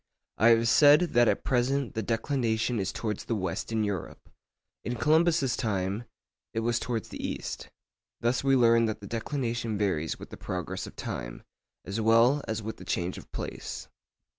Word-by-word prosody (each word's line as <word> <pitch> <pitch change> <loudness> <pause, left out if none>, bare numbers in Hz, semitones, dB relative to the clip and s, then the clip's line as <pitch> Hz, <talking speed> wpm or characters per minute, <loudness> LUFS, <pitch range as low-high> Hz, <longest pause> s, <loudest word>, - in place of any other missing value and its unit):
I 110 - +6
have 115 0 +5
said 145 +6 +7
that 120 0 +5
at - - +1
present 130 +1 +1
the 110 - -2
declination 115 0 0
is 95 -1 -1
towards 105 -3 -4
the 115 - -1
west 95 0 -3
in 110 -1 +1
Europe. 100 -5 -5 0.5
In 120 - -3
Columbus's 155 -1 +3
time 100 0 -2 0.5
it 115 - +1
was 120 +1 +1
towards 115 -3 -3
the - - -7
east. - - -4 0.5
Thus 120 +3 0
we 135 -1 +4
learn 115 -2 +5
that 110 -1 -2
the 100 - -10
declination 115 -1 -2
varies 90 -6 0
with - - -11
the - - -8
progress 90 0 -4
of - - -12
time, - - -6 0.4
as 100 +4 -3
well 115 +6 +5
as 110 0 -3
with 110 +1 -6
change 90 +1 -2
of - - -16
place. - - -6
115 Hz, 170 wpm, -28 LUFS, 105-125 Hz, 0.5 s, said